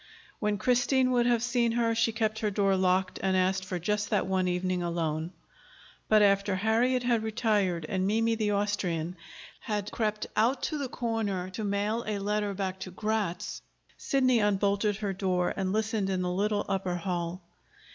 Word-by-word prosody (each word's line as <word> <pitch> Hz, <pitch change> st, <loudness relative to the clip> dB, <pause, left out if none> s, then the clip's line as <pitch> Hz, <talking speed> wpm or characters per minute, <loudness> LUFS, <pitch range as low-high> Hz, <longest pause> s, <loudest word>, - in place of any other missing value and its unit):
When 210 Hz, -1 st, 0 dB
Christine 255 Hz, +3 st, +2 dB
would 240 Hz, -1 st, +3 dB
have 235 Hz, -1 st, +2 dB
seen 240 Hz, -2 st, +1 dB
her, 230 Hz, -1 st, +1 dB
she 225 Hz, 0 st, +2 dB
kept 220 Hz, -1 st, -1 dB
her 215 Hz, -, 0 dB
door 195 Hz, -1 st, +2 dB
locked 185 Hz, 0 st, +1 dB
and 190 Hz, -1 st, +1 dB
asked 190 Hz, +1 st, +1 dB
for 185 Hz, -1 st, -4 dB
just 205 Hz, +4 st, -1 dB
that 205 Hz, -, +1 dB
one 185 Hz, -1 st, 0 dB
evening 180 Hz, 0 st, -1 dB
alone. 165 Hz, -1 st, -2 dB, 0.8 s
But 215 Hz, -1 st, +6 dB
after 200 Hz, -1 st, +3 dB
Harriet 230 Hz, +5 st, +2 dB
had 240 Hz, -2 st, +2 dB
retired, 210 Hz, -6 st, 0 dB
and 190 Hz, +2 st, 0 dB
Mimi, 225 Hz, +2 st, +2 dB
the 215 Hz, -2 st, 0 dB
Austrian, 190 Hz, -5 st, -1 dB, 0.4 s
had 210 Hz, -2 st, -3 dB
crept 215 Hz, -2 st, -1 dB
out 240 Hz, +5 st, +2 dB
to 305 Hz, -, -1 dB
the 275 Hz, -3 st, -3 dB
corner 210 Hz, -7 st, -2 dB
to 215 Hz, +4 st, -5 dB
mail 205 Hz, +3 st, -1 dB
a 210 Hz, -1 st, -1 dB
letter 205 Hz, 0 st, -1 dB
back 190 Hz, -1 st, -3 dB
to 190 Hz, -, -6 dB
Gratz, 205 Hz, -2 st, -2 dB, 0.3 s
Sidney 255 Hz, -3 st, +2 dB
unbolted 205 Hz, 0 st, +1 dB
her 200 Hz, -1 st, -3 dB
door 185 Hz, -2 st, 0 dB
and 190 Hz, -1 st, -1 dB
listened 215 Hz, -1 st, 0 dB
in 185 Hz, -1 st, 0 dB
the 180 Hz, -, -1 dB
little 205 Hz, +2 st, 0 dB
upper 190 Hz, -2 st, -1 dB
hall. 175 Hz, 0 st, -3 dB
205 Hz, 175 wpm, -29 LUFS, 185-220 Hz, 0.8 s, But